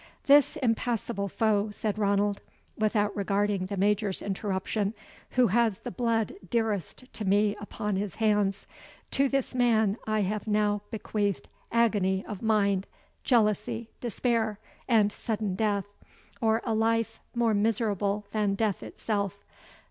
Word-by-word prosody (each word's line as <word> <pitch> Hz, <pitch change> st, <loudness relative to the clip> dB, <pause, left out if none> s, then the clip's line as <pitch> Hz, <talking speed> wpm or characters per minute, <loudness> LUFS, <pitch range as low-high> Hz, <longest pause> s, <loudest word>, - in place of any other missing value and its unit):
"This 285 Hz, -1 st, +6 dB
impassible 230 Hz, -3 st, -1 dB
foe," 210 Hz, +1 st, +1 dB
said 210 Hz, 0 st, -3 dB
Ranald, 200 Hz, 0 st, +1 dB, 0.3 s
without 210 Hz, -1 st, +1 dB
regarding 200 Hz, -1 st, 0 dB
the 200 Hz, 0 st, -4 dB
Major's 205 Hz, 0 st, +1 dB
interruption, 200 Hz, +1 st, -2 dB, 0.4 s
"who 250 Hz, -, +6 dB
has 225 Hz, -1 st, +2 dB
the -, -, -7 dB
blood 230 Hz, 0 st, 0 dB, 0.2 s
dearest 225 Hz, -, -1 dB
to 215 Hz, -, -5 dB
me 205 Hz, +1 st, +3 dB
upon 210 Hz, -1 st, -3 dB
his 200 Hz, -1 st, -3 dB
hands 210 Hz, -3 st, +1 dB, 0.5 s
to 275 Hz, 0 st, +2 dB
this 275 Hz, -1 st, -1 dB
man 225 Hz, -4 st, +3 dB
I 215 Hz, -1 st, +1 dB
have 210 Hz, +3 st, -2 dB
now 210 Hz, -1 st, +2 dB
bequeathed 205 Hz, -6 st, -2 dB, 0.2 s
agony 205 Hz, -5 st, +2 dB
of 205 Hz, -, -6 dB
mind, 200 Hz, -4 st, +2 dB, 0.4 s
jealousy, 225 Hz, -1 st, +1 dB
despair, 230 Hz, -2 st, 0 dB, 0.3 s
and 215 Hz, -4 st, +4 dB
sudden 210 Hz, -3 st, -2 dB
death, 200 Hz, 0 st, 0 dB, 0.6 s
or 225 Hz, 0 st, +2 dB
a 230 Hz, -, 0 dB
life 225 Hz, 0 st, +1 dB
more 235 Hz, -2 st, +2 dB
miserable 210 Hz, -1 st, 0 dB
than 210 Hz, -2 st, +1 dB
death 210 Hz, -2 st, 0 dB
itself. 200 Hz, -2 st, -3 dB
210 Hz, 130 wpm, -28 LUFS, 200-225 Hz, 0.6 s, This